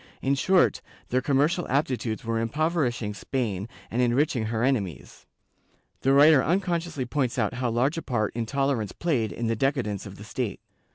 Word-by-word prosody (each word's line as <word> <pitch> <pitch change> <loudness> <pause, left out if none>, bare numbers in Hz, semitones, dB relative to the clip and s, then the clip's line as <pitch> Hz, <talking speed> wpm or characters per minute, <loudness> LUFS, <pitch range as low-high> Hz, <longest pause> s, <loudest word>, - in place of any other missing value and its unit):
^ - - -23 0.2
In 135 - +1
short, 180 +6 +3 0.3
their 130 +1 +1
commercial 145 +6 +1
aptitudes 125 -5 -1
were 115 0 0
impoverishing 120 -3 0
Spain 105 -3 -3 0.2
and 120 - +1
enriching 125 0 +2
her 110 +1 -1
enemies. 100 - -2 0.7
The 135 - +3
writer 140 0 +7
unconsciously 170 -5 -1
points 130 -1 -1
out 105 -4 0
how 125 0 -1
large 130 +8 +1
a - - -6
part 110 -7 -1
intolerance 120 -2 -1
played 130 -11 0
in 120 - -4
the 115 0 +1
decadence 115 -6 -1
of 100 - -10
the 105 - -11
state. 110 -1 -4
125 Hz, 165 wpm, -26 LUFS, 115-145 Hz, 0.7 s, writer